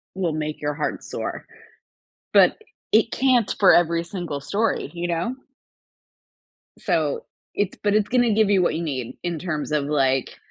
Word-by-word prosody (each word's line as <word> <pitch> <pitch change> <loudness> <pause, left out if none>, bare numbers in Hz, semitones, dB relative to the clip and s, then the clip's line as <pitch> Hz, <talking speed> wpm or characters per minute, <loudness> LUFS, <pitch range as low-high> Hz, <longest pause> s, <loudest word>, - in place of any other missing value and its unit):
will 180 -4 -1
make 155 0 -4
your 150 0 -1
heart 150 0 -3
soar, - - -5 0.9
but - - +6 0.4
it 225 +1 +4
can't 255 -5 +2
for 195 - +7
every 170 -1 +3
single 170 -4 -5
story, 210 +10 -1
you 175 0 -3
know? 175 +9 -2 1.4
So, 480 -1 -1 0.3
it's 205 -1 -1
but 205 0 +2
it's 210 -1 +2
gonna 245 -3 +2
give 215 -1 +3
you 195 -2 +4
what 175 - +1
you 170 - -2
need 130 -7 -4
in 175 -2 -2
terms 155 -4 -3
of, 150 -2 +1
like, 135 -3 0
175 Hz, 160 wpm, -23 LUFS, 150-210 Hz, 1.4 s, for